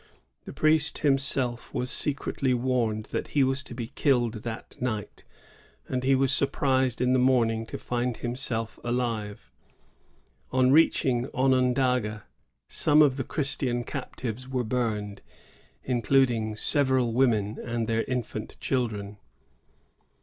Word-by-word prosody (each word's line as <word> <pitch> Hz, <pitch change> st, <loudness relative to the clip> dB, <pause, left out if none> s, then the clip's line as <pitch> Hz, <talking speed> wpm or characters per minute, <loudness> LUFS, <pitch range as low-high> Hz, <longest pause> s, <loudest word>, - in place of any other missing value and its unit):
The -, -, -7 dB
priest 155 Hz, -1 st, +3 dB
himself 135 Hz, -3 st, 0 dB
was 125 Hz, +1 st, -2 dB
secretly 135 Hz, -2 st, -1 dB
warned 120 Hz, -4 st, 0 dB
that -, -, -3 dB
he 140 Hz, -, +6 dB
was 135 Hz, +1 st, 0 dB
to 120 Hz, -, -8 dB
be 120 Hz, -2 st, -4 dB
killed 120 Hz, -4 st, 0 dB
during 115 Hz, -1 st, -5 dB
the -, -, -11 dB
night; 110 Hz, -5 st, -4 dB, 0.6 s
and 130 Hz, -1 st, -2 dB
he 135 Hz, +1 st, +4 dB
was 135 Hz, 0 st, +2 dB
surprised 130 Hz, -3 st, +1 dB
in 125 Hz, 0 st, +3 dB
the 130 Hz, -, +3 dB
morning 115 Hz, -3 st, +2 dB
to -, -, -6 dB
find 120 Hz, -1 st, -2 dB
himself 120 Hz, -2 st, -2 dB
alive. 115 Hz, -4 st, -3 dB, 1.0 s
^ -, -, -1 dB
On 130 Hz, 0 st, +5 dB
reaching 130 Hz, -4 st, +3 dB
Onondaga, 125 Hz, -4 st, +1 dB, 0.4 s
some 150 Hz, +1 st, +4 dB
of 135 Hz, -3 st, +3 dB
the 130 Hz, -, -1 dB
Christian 130 Hz, -3 st, -1 dB
captives 125 Hz, +1 st, -6 dB
were 130 Hz, -2 st, -1 dB
burned, 110 Hz, -4 st, -2 dB, 0.6 s
including 120 Hz, -3 st, +1 dB
several 130 Hz, 0 st, +2 dB
women 110 Hz, -4 st, +1 dB
and 115 Hz, -1 st, -2 dB
their 115 Hz, 0 st, 0 dB
infant 125 Hz, -3 st, -4 dB
children. 105 Hz, -5 st, -2 dB
125 Hz, 130 wpm, -27 LUFS, 115-130 Hz, 1.0 s, he